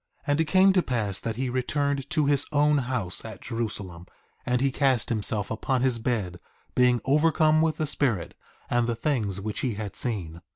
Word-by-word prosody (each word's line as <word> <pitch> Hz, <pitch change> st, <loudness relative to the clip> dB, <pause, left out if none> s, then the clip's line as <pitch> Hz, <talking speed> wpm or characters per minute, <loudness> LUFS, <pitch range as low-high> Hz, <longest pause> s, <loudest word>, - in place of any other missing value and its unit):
1:7 -, -, -42 dB
And 145 Hz, +1 st, +2 dB
it -, -, +1 dB
came 190 Hz, +4 st, +5 dB
to 185 Hz, -, +4 dB
pass 105 Hz, -, -2 dB
that 115 Hz, -1 st, -4 dB
he 130 Hz, +3 st, -2 dB
returned 140 Hz, +2 st, -1 dB
to 155 Hz, -3 st, +1 dB
his 140 Hz, 0 st, +2 dB
own 150 Hz, 0 st, +3 dB
house 120 Hz, -8 st, -2 dB
at 110 Hz, -4 st, -8 dB
Jerusalem; 100 Hz, -7 st, -4 dB, 0.4 s
and 125 Hz, 0 st, +2 dB
he 135 Hz, +1 st, +1 dB
cast 130 Hz, -3 st, +1 dB
himself 105 Hz, -2 st, -1 dB
upon 125 Hz, +3 st, -1 dB
his 125 Hz, -3 st, +2 dB
bed, 110 Hz, -7 st, -2 dB, 0.4 s
being 125 Hz, -1 st, +3 dB
overcome 155 Hz, +2 st, +3 dB
with 160 Hz, -1 st, +1 dB
the 155 Hz, -, 0 dB
Spirit 125 Hz, -, 0 dB, 0.3 s
and 120 Hz, -1 st, +1 dB
the 120 Hz, -, -1 dB
things 110 Hz, -7 st, -1 dB
which 105 Hz, +1 st, -4 dB
he 125 Hz, -5 st, -1 dB
had 105 Hz, -2 st, -6 dB
seen. 85 Hz, -9 st, -2 dB
125 Hz, 195 wpm, -26 LUFS, 110-145 Hz, 0.4 s, came